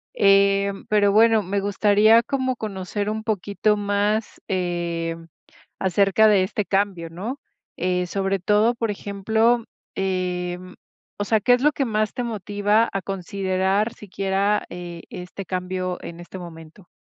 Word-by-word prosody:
eh, 200 Hz, 0 st, +4 dB, 0.2 s
pero, 205 Hz, -1 st, +4 dB
bueno, 220 Hz, 0 st, +5 dB
me 200 Hz, +2 st, -1 dB
gustaría 210 Hz, +3 st, +4 dB
como 260 Hz, -1 st, -1 dB
conocer 205 Hz, -1 st, -4 dB
un 220 Hz, 0 st, -4 dB
poquito 210 Hz, 0 st, 0 dB
más, 205 Hz, +2 st, -1 dB
eh, 170 Hz, -2 st, -2 dB, 0.7 s
acerca 195 Hz, +3 st, +3 dB
de 205 Hz, -3 st, +5 dB
este 205 Hz, +2 st, -2 dB
cambio, 195 Hz, -4 st, -1 dB
¿no? 205 Hz, +12 st, -6 dB, 0.4 s
Eh, 180 Hz, 0 st, 0 dB
sobre 195 Hz, +1 st, -1 dB
todo, 210 Hz, +5 st, +3 dB
por 230 Hz, -2 st, -2 dB
ejemplo, 220 Hz, +4 st, +1 dB, 0.3 s
em 180 Hz, -1 st, -3 dB, 0.5 s
o -, -, +1 dB
sea, 220 Hz, +1 st, +2 dB
¿qué 245 Hz, +5 st, +3 dB
es 250 Hz, +1 st, +3 dB
lo 300 Hz, -, +5 dB
que 275 Hz, -, -1 dB
más 215 Hz, -2 st, 0 dB
te 245 Hz, -1 st, -3 dB
motiva 210 Hz, 0 st, +1 dB
a 195 Hz, -, -1 dB
considerar 195 Hz, +2 st, -1 dB
siquiera, 200 Hz, +1 st, -1 dB
eh, 175 Hz, -1 st, -7 dB
este 180 Hz, +2 st, -7 dB
cambio 185 Hz, 0 st, -3 dB
en 170 Hz, 0 st, -8 dB
este 175 Hz, +2 st, -10 dB
momento? 170 Hz, +1 st, -11 dB
200 Hz, 140 wpm, -23 LUFS, 185-215 Hz, 0.7 s, bueno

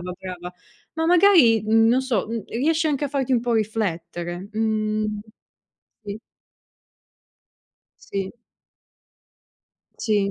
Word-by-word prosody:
"brava, 180 Hz, +1 st, -5 dB
brava." 180 Hz, -1 st, -8 dB, 0.4 s
Ma 320 Hz, 0 st, -1 dB
magari, 340 Hz, -, +6 dB
mhmm, 225 Hz, +1 st, +4 dB
non 250 Hz, +3 st, +3 dB
so, 240 Hz, -6 st, -1 dB
mhmm, 230 Hz, -3 st, -4 dB
riesce 315 Hz, +7 st, 0 dB
anche 295 Hz, -2 st, -1 dB
a -, -, -7 dB
farti 270 Hz, -2 st, -1 dB
un 245 Hz, -, +3 dB
po' 240 Hz, 0 st, -1 dB
riflettere, 175 Hz, -4 st, -3 dB
mhmm, 215 Hz, -1 st, -1 dB, 0.9 s
sì. 205 Hz, +1 st, -5 dB, 1.8 s
Sì. 195 Hz, -1 st, -4 dB, 1.7 s
Sì. 205 Hz, -3 st, +1 dB
220 Hz, 110 wpm, -23 LUFS, 195-255 Hz, 1.8 s, magari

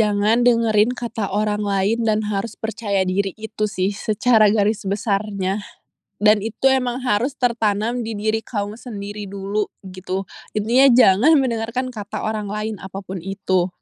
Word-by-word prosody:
Jangan 210 Hz, +2 st, +2 dB
dengerin 230 Hz, 0 st, +3 dB
kata 230 Hz, -4 st, -3 dB
orang 210 Hz, +1 st, 0 dB
lain 200 Hz, +3 st, +1 dB
dan 215 Hz, 0 st, +1 dB
harus 205 Hz, +2 st, -3 dB
percaya 210 Hz, -3 st, -1 dB
diri! 190 Hz, +1 st, 0 dB
Itu 220 Hz, -1 st, -4 dB
sih 195 Hz, -1 st, -1 dB
secara 215 Hz, +1 st, +3 dB
garis 215 Hz, 0 st, +2 dB
besarnya, 200 Hz, -1 st, -1 dB, 0.6 s
dan 210 Hz, 0 st, +4 dB
itu 225 Hz, +5 st, -2 dB
emang 250 Hz, 0 st, -2 dB
harus 245 Hz, +3 st, +1 dB
tertanam 230 Hz, -1 st, 0 dB
di 225 Hz, -, -3 dB
diri 215 Hz, +2 st, 0 dB
kamu 205 Hz, -2 st, -4 dB
sendiri 205 Hz, -3 st, -6 dB
dulu, 200 Hz, +2 st, -2 dB, 0.2 s
gitu. 185 Hz, +1 st, -4 dB, 0.3 s
Intinya 235 Hz, +6 st, +4 dB
jangan 210 Hz, +10 st, +6 dB
mendengarkan 245 Hz, -1 st, -1 dB
kata 210 Hz, -2 st, -6 dB
orang 215 Hz, -2 st, -2 dB
lain 215 Hz, +1 st, -3 dB
apapun 190 Hz, -1 st, -7 dB
itu. 190 Hz, -1 st, -1 dB
210 Hz, 145 wpm, -21 LUFS, 200-225 Hz, 0.6 s, jangan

